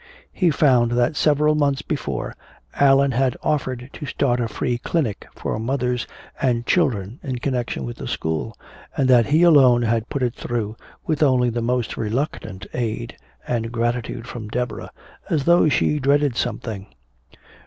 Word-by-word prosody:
He 180 -3 +2
found 125 -6 +3
that 120 +5 +2
several 150 0 +3
months 145 -2 +1
before - - -3 0.4
Allan 140 0 +4
had 130 0 +1
offered 130 -4 -1
to 145 - -7
start 125 -1 0
a 120 - 0
free 120 +1 -2
clinic 130 - -2
for - - -3
mothers 125 +1 -1 0.3
and 120 -3 +1
children 120 - 0
in 130 -3 -4
connection 120 - -2
with - - -6
the - - -6
school, 80 +8 -3 0.4
and 135 -3 +2
that 120 -3 +5
he 155 +4 +4
alone 130 -8 +6
had 115 0 0
put 140 -3 -2
it 120 -2 0
through, 115 -4 -3 0.3
with 155 -2 -1
only 130 -4 +3
the 120 +1 -2
most 125 0 -1
reluctant 110 -4 -3
aid 120 -1 -3 0.3
and 115 -1 -1
gratitude 120 -1 -2
from 115 -4 -7
Deborah 120 0 -3 0.4
as 150 -4 +1
though 170 0 +5
she 150 +2 +1
dreaded 140 -1 +2
something. 105 -4 -3
125 Hz, 155 wpm, -22 LUFS, 115-140 Hz, 0.4 s, alone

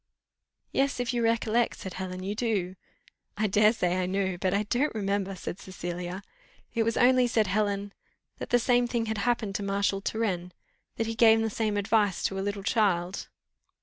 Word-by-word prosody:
"Yes, 275 -1 +1
if 245 0 -1
you 240 -1 0
recollect," 230 +1 +1
said 190 - -7
Helen, 185 0 -5
"you 200 +2 -2
do." 210 -5 -1 0.6
"I 215 - +1
dare 210 +1 +5
say 180 -5 0
I 180 - -1
know, 190 0 0
but 185 +1 -1
I 200 +2 +1
don't 245 +6 0
remember," 200 -2 -1
said 180 +1 -6
Cecilia. 180 0 -6 0.5
"It 230 - +1
was 230 0 0
only," 250 0 +5
said 225 -2 +2
Helen, 200 0 -1 0.5
"that - - -5
the 245 - +5
same 245 0 +2
thing 235 -1 -1
had 220 -1 -2
happened 225 -2 0
to - - -6
Marshal 200 0 0
Turenne, 185 -5 -2 0.4
that 225 - -1
he 225 - -2
gave 225 -1 +5
the 225 -1 -1
same 215 -1 -1
advice 205 -1 +1
to 195 - -1
a - - -1
little 200 0 -3
child." 195 -5 0
205 Hz, 185 wpm, -28 LUFS, 190-225 Hz, 0.6 s, dare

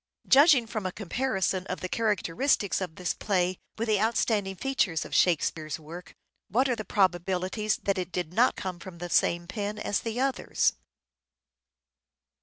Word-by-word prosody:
Judging 280 -3 +6
from 220 -2 -4
a - - -4
comparison 195 -2 -1
of 185 - -4
the 185 - -2
characteristics 210 +1 0
of 180 -4 -4
this 180 -1 -2
play 185 -3 0 0.2
with 230 +1 -2
the 210 -2 +2
outstanding 215 -3 +1
features 195 - 0
of - - -10
Shakespeare's 160 -3 +1
work, 165 +3 -10 0.3
what 255 +8 +2
are 250 - +1
the 215 - -5
probabilities 190 +2 0
that 195 -1 0
it 180 0 -4
did 175 -1 -3
not 240 +6 +3
come 185 -2 -5
from 185 -2 -10
the 175 0 -6
same 175 0 +2
pen 205 +3 -4
as 210 -1 -1
the 230 +1 -4
others 270 0 +1
195 Hz, 160 wpm, -28 LUFS, 180-225 Hz, 0.3 s, Judging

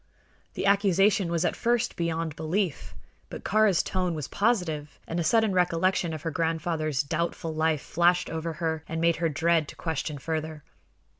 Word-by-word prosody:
The - - -2
accusation 200 -1 +3
was 170 0 0
at - - 0
first 240 0 0
beyond 165 -2 -2
belief; 160 - -2 0.3
but - - -8
Kāra's 210 -4 +3
tone 180 -3 -1
was 150 -3 -4
positive 170 -10 -1
and 165 - -2
a - - +1
sudden 220 +4 +3
recollection 180 0 +1
of 155 -2 -6
her 165 - -2
grandfather's 160 -2 -1
doubtful 165 +2 -2
life 155 -2 +1
flashed 175 +1 +2
over 165 0 -3
her 160 -1 -2
and 165 - -3
made 170 0 +2
her 165 -1 +1
dread 165 +1 +2
to - - -10
question 160 -2 -3
further. 155 +1 -4
165 Hz, 165 wpm, -27 LUFS, 155-180 Hz, 0.3 s, accusation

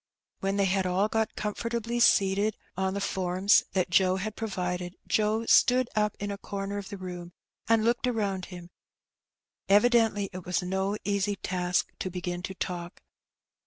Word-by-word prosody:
When 195 +1 -1
they 200 - +3
had 190 0 +1
all 185 +3 +2
got 220 0 -1
comfortably 230 +2 -2
seated 200 -2 +3 0.2
on 190 +1 -1
the - - -1
forms 190 0 +2
that 185 -2 0
Joe 185 +1 +4
had 210 +3 -4
provided, 180 -4 -3
Joe 215 +1 +1
stood 250 +1 +4
up 210 -1 +1
in 205 0 -3
a 200 - -6
comer 200 0 -4
of 200 - -8
the 200 - -6
room, 180 -2 -7 0.4
and 225 -1 +4
looked 240 +2 +1
around 200 -6 -1
him: 175 -1 -10 1.0
evidently 210 -1 +4
it 185 0 -7
was 180 +1 -1
no 190 +3 -1
easy 200 +1 0
task 180 -1 -1
to 185 - -2
begin 180 0 -4
to 190 +1 -6
talk. 175 -1 -5
195 Hz, 165 wpm, -28 LUFS, 185-210 Hz, 1.0 s, Joe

